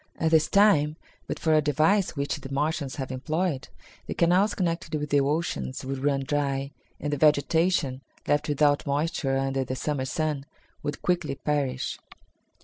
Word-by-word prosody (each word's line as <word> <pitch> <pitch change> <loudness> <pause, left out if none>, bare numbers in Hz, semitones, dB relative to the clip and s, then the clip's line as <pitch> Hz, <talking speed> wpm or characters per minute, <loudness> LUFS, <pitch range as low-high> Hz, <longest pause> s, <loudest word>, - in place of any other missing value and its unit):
At 160 -1 +1
this 160 -1 +5
time, 160 -8 +4 0.3
but - - -3
for 160 0 +1
a 155 - +5
device 155 +8 +2
which 140 0 -1
the 135 - -9
Martians 145 0 -1
have 135 -3 -4
employed, 150 +1 -2 0.4
the - - -4
canals 185 +5 +3
connected 170 -3 -2
with 150 -1 -5
the 145 -1 +4
oceans 135 - -2
would 135 0 -4
run 140 -1 +2
dry, 140 -1 -1 0.3
and 145 0 -2
the - - 0
vegetation, 150 -1 +2 0.3
left 145 +1 +1
without 145 0 +2
moisture 140 -2 0
under 135 0 0
the 130 +1 -4
Summer 135 0 -2
sun, 150 0 -2 0.3
would 145 - -4
quickly 170 -6 0
perish." 135 -2 -2
145 Hz, 160 wpm, -26 LUFS, 135-160 Hz, 0.4 s, this